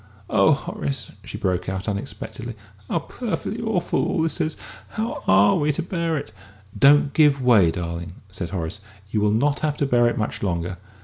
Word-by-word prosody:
Oh, - - +5
Horace," 70 -1 -4
she - - -7
broke 90 -1 -1
out, 95 +1 -4
unexpectedly, 110 +3 -5 0.3
"how - - +1
perfectly 225 - -4
awful 220 -6 0
all 165 - +1
this 165 - 0
is! 155 - -1 0.3
How 225 +2 -3
are 95 +2 +5
we 150 0 +2
to 160 - -2
bear 170 -2 -1
it?" 125 - -6 0.4
"Don't 140 +5 +5
give 145 -3 +5
way, 115 -9 +5
darling!" 85 0 -4 0.2
said 90 -2 -4
Horace; 90 +2 -4 0.3
"you 105 - +1
will 105 - +3
not 140 +7 +2
have 150 -1 -1
to 140 - +1
bear 120 -3 +4
it 120 - 0
much 110 - -2
longer." 90 -1 -2
120 Hz, 180 wpm, -23 LUFS, 95-155 Hz, 0.4 s, Oh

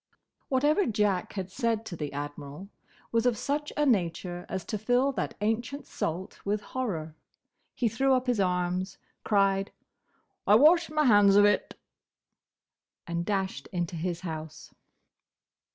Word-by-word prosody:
Whatever 295 +8 +2
Jack 205 -4 0
had 190 -2 -5
said 230 -1 -1
to 185 - -6
the 150 -3 -4
Admiral 145 +5 -7 0.4
was 230 +1 +2
of 240 -3 +1
such 295 +5 -2
a 295 - +3
nature 175 - 0
as 190 -2 -4
to 215 - -3
fill 245 +5 +2
that 205 -9 -3
ancient 235 +6 -1
salt 175 +4 -4
with 205 +1 0
horror. 180 -11 -4 0.6
He 240 - +1
threw 265 +4 +2
up 255 0 0
his 245 -4 0
arms, 180 0 0 0.3
cried, 195 -1 +2 0.8
"I 205 - +7
wash 320 +8 +6
my 305 -1 +1
hands 205 -4 +6
of 205 0 +7
it!" 205 - +1 1.3
and 170 0 -2
dashed 190 -8 -2
into 175 -1 -2
his 170 +1 -3
house. 160 -2 -7
200 Hz, 140 wpm, -28 LUFS, 175-245 Hz, 1.3 s, I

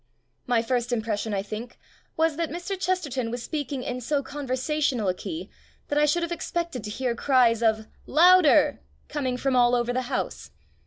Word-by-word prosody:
My 240 -2 +2
first 240 0 -1
impression, 220 -2 -1
I 195 -1 -1
think, 215 +4 -7 0.4
was 320 -1 +2
that 335 0 -2
Mr. 350 +4 -4
Chesterton 320 -10 -1
was 240 +1 -4
speaking 290 -3 -3
in 250 0 -4
so 280 +3 0
conversational 270 -3 -1
a - - +2
key 320 - -6 0.4
that 290 - +1
I 300 - +4
should 340 +4 +1
have 340 - -3
expected 340 -7 -3
to - - -4
hear 245 +3 -1
cries 240 -2 +3
of 220 -1 +2 0.2
"Loud 355 +2 +6
er!" - - +4 0.3
coming 260 -4 -2
from 265 +1 0
all 245 0 +5
over 240 0 0
the 255 - 0
house. - - -3
255 Hz, 180 wpm, -26 LUFS, 235-305 Hz, 0.4 s, Loud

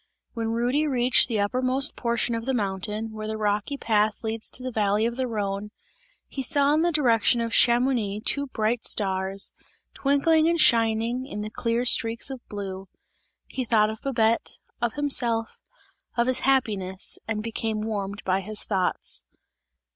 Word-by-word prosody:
When 230 -2 -3
Rudy 250 +6 +1
reached 250 -2 +3
the 225 -4 -1
uppermost 255 +6 +1
portion 235 0 0
of 230 0 -3
the 265 0 0
mountain, 210 +1 -2
where 215 0 -6
the 220 0 -3
rocky 210 +6 -1
path 215 -2 +1
leads 220 0 -2
to 250 - -5
the 255 - -3
valley 210 -1 +1
of 235 0 -1
the 260 0 -1
Rhone, 205 -2 -3 0.6
he 270 - -5
saw 280 +2 +2
in 310 - +3
the 345 +1 +2
direction 240 -6 +3
of 230 -1 -2
Chamouni, 235 -4 +3
two 280 +6 -1
bright 225 -1 -1
stars, 190 -1 -1 0.4
twinkling 310 +3 +3
and 340 0 +1
shining 230 -1 +3
in 210 - -5
the 215 - -6
clear 230 +2 -1
streaks 230 +2 +1
of 260 -2 -7
blue; 195 -2 -6 0.6
he 260 - -4
thought 215 -2 +3
of 220 - -9
Babette, 230 -4 0 0.2
of 240 -2 0
himself, 240 -6 0 0.6
of 235 - +3
his 255 0 +2
happiness 205 -9 0
and 215 -1 -2
became 220 -1 -2
warmed 205 -2 -4
by 185 0 +1
his 210 +2 -2
thoughts. 190 -3 -1
230 Hz, 160 wpm, -25 LUFS, 210-255 Hz, 0.6 s, reached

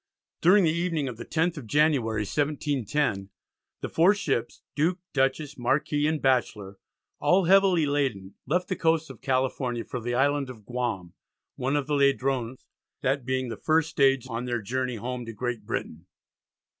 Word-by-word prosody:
During 190 +4 +6
the 160 - +3
evening 165 -4 -1
of 125 -3 -6
the 120 - -8
10th 165 +1 0
of 130 -6 -8
January, 130 -6 +2
1710, 145 -5 -1 0.5
the - - -3
four 180 +6 +4
ships 135 - -2
Duke, 165 +5 +1 0.2
Dutchess, 135 +1 0
Marquis 145 +4 +1
and 155 0 0
Batchelor, 105 -7 0 0.4
all 185 0 +3
heavily 190 -3 +5
laden, 130 -10 -1
left 180 +6 0
the 185 - -1
coast 160 -1 +1
of - - -14
California 130 -2 -1
for 125 - -5
the 120 +1 -2
Island 140 +1 +1
of 110 -5 -11
Guam, 110 -8 -3 0.4
one 135 +3 -1
of 145 -2 0
the 150 - -2
Ladrones, 135 -3 +1 0.4
that 135 -1 0
being 130 -1 -1
the 115 - -5
first 160 0 +1
stage 135 -3 +3
on 120 0 -4
their 120 -3 -2
journey 125 +3 -2
home 125 +3 -4
to 115 - -6
Great 115 -1 -4
Britain. 85 -6 -5
135 Hz, 165 wpm, -26 LUFS, 120-150 Hz, 0.5 s, During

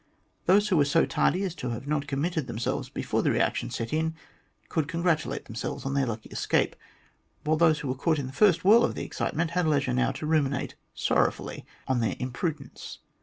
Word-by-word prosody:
Those 205 +3 +5
who 185 - +3
were 145 - +5
so 160 +4 +3
tardy 185 +3 +1
as 190 - -1
not - - -21
to 125 - -3
have 140 +5 -2
committed 150 +1 -1
themselves 120 -1 -2
before - - -1
the - - +2
reaction - - +1
set 115 +3 -4
in 160 +1 0 0.5
could 160 -3 -1
congratulate 165 -1 0
themselves 115 +3 -5
on 135 - -1
their 140 -2 +1
lucky 110 -1 -5
escape, - - +1 0.7
while 155 +1 +2
those 155 -2 +4
who 145 - -4
were 130 - 0
caught 155 +5 +1
in 140 - -2
the 130 - -7
first 180 -1 +4
whirl 225 +4 +7
of - - 0
the - - -4
excitement 165 +1 -2
had 180 -1 +1
leisure 140 -4 +2
now 125 +1 +2
to 145 - -5
ruminate 150 -3 +1 0.2
sorrowfully - - 0 0.2
on 130 -2 +1
their 115 - 0
imprudence. 135 +5 -4
150 Hz, 200 wpm, -27 LUFS, 130-170 Hz, 0.7 s, whirl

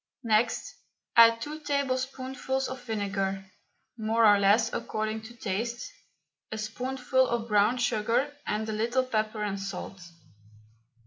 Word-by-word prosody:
Next 225 +1 +1 0.4
add 230 0 +7
two 300 +4 -5
tablespoonfuls 265 -2 -2
of 260 0 -6
vinegar 195 -3 -2 0.5
more 225 +1 +3
or 205 -1 +7
less 200 +3 +3
according 215 0 -2
to 240 +2 -11
taste 235 - -3 0.6
a 220 - -3
spoonful 255 +4 0
of 235 -1 -2
brown 210 +3 +3
sugar, 245 +4 0
and 215 +1 -1
a - - -2
little 235 +4 +1
pepper 215 -3 -1
and 200 -1 -2
salt. 195 -1 -6
230 Hz, 125 wpm, -28 LUFS, 210-255 Hz, 0.6 s, add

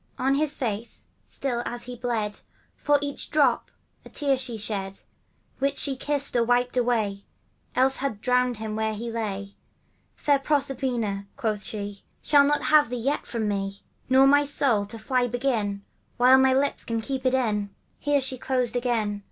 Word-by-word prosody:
On 270 +1 +1
his 295 +1 +1
face, 230 -3 -4 0.2
still 245 -3 -2
as 240 0 -4
he 250 0 -7
bled, 225 -4 -2 0.4
For 290 0 +2
each 285 -1 -4
drop 280 -6 +2 0.3
a - - -13
tear 280 -2 +1
she 255 -3 -4
shed, 195 -2 -2 0.6
Which 280 +1 0
she 275 -2 +1
kissed 285 +1 +1
or 235 - +4
wiped 245 +1 +1
away, 220 -5 0 0.5
Else 265 +1 +4
had 260 -6 -3
drowned 250 0 +1
him 220 -1 -4
where 220 0 -1
he 230 +2 -5
lay. 200 -3 -3 0.4
* - - -42
Fair 285 -2 +2
Proserpina,' 255 -8 -1
quoth 210 -2 -2
she, 205 -2 -5
' - - -42
Shall 285 -2 +5
not 295 +1 +1
have 300 -5 +5
thee 250 - -3
yet 275 +5 -1
from 225 -3 -2
me; 200 -1 -3 0.3
Nor 265 +1 +6
thy 285 +1 +5
soul, 270 -7 +1
to 210 +3 -5
fly 245 +3 0
begin; 230 -5 -1 0.3
While 255 +2 +6
my 265 0 +5
lips 280 +1 0
can 230 -1 -2
keep 265 +2 -3
it 260 0 +2
in! 210 -5 0 0.2
' - - -41
Here 290 -1 +2
she 260 -1 -2
ceased 250 -2 +1
again. 230 -4 0
245 Hz, 180 wpm, -25 LUFS, 215-270 Hz, 0.6 s, Nor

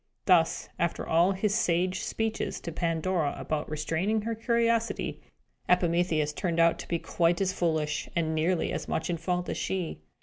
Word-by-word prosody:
Thus, 170 -4 +3
after 170 0 -1
all 170 +4 +4
his 200 +2 0
sage 185 -3 +1
speeches 220 +1 -2
to 170 - -5
Pandora 165 -1 0
about 155 -1 -3
restraining 165 +8 -1
her 230 +1 -1
curiosity, 230 0 0 0.5
Epimetheus 170 -4 +2
turned 170 0 -1
out 165 0 +4
to - - -7
be 170 - 0
quite 170 +1 +1
as 190 -1 +1
foolish, 155 -3 -1
and 160 -2 0
nearly 165 +2 +1
as - - -4
much 160 +2 -1
in 170 - -1
fault 180 +2 -2
as - - -3
she. 180 - -3
175 Hz, 165 wpm, -28 LUFS, 160-190 Hz, 0.5 s, all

